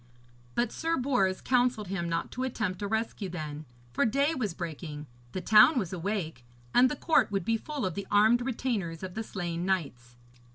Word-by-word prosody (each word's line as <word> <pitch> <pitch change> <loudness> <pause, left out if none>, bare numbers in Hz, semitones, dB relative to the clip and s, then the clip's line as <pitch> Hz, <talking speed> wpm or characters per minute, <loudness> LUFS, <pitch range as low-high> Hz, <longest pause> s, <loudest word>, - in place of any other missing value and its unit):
But 240 -1 +1
Sir 330 +1 -1
Bors 245 -8 +1
counselled 245 -5 +1
him 170 -3 -2
not 165 0 -2
to 255 - -5
attempt 215 -7 -2
a 205 - -1
rescue 220 -2 -2
then, 155 -3 -6 0.3
for - - +2
day 280 +7 +2
was 215 - -2
breaking, 155 -3 -6 0.3
the 185 - -4
town 220 - +7
was 190 -6 -1
awake, 175 - -3 0.3
and 250 +1 +6
the 295 - -2
court 285 -6 +3
would 195 -4 -1
be 225 - +2
full 280 +1 -4
of 185 - -1
the 200 +2 -5
armed 215 +4 +5
retainers 225 -9 -2
of 185 -1 -5
the 225 - -3
slain 175 -5 -4
knights. 140 -11 -2
200 Hz, 190 wpm, -29 LUFS, 170-245 Hz, 0.3 s, town